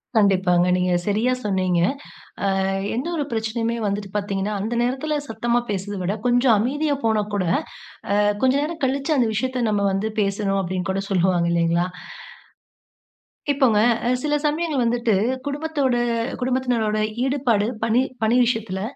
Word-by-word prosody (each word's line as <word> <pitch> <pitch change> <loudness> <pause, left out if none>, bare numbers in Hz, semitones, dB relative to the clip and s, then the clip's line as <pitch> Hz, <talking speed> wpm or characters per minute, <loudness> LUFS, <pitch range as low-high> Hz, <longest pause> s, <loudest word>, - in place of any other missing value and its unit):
கண்டிப்பாங்க. 185 -4 +3
நீங்க 180 0 +1 0.2
சரியா 220 +5 +1
சொன்னீங்க. 185 -3 +1 0.7
அ, - - +2 0.5
எந்த 255 +7 -2
ஒரு 295 - -1
பிரச்சனையுமே 225 +1 -1
வந்துட்டு 200 0 -3
பார்த்தீங்கன்னா, 200 0 -2
"அந்த 220 +4 -2
நேரத்துல 265 +5 -1
சத்தமா 235 +2 0
பேசுறத 200 0 -3
விட 185 +3 -1
கொஞ்சம் 245 0 +4
அமைதியா 290 +7 0
போனா 220 -2 +2
கூட, 200 -2 0 0.7
அ, - - +2 0.3
கொஞ்சம் 265 +2 +3
நேரம் 325 0 -5
கழிச்சு 275 +4 0
அந்த 245 -4 +2
விஷயத்த 255 +2 -1
நம்ம 205 -1 +1
வந்து 205 +3 -1
பேசணும்." 195 0 0
அப்படீன்னு 185 +1 -3
கூட 195 +1 -1
சொல்லுவாங்க 180 -2 +2
இல்லையா? 170 +1 +2 1.7
இப்போங்க, 260 -7 +3 0.3
அ, - - +2
சில 295 0 +1
சமயங்கள் 300 -3 0
வந்துட்டு, 235 -2 +1 0.3
"குடும்பத்தோட 285 -3 -1 0.5
குடும்பத்தினரோட 245 -4 0 0.2
ஈடுபாடு, 250 -6 +1 0.2
பணி 230 +2 +3 0.2
பணி 230 +3 +3
விஷயத்துல, 220 -5 -2
220 Hz, 135 wpm, -22 LUFS, 195-260 Hz, 1.7 s, கொஞ்சம்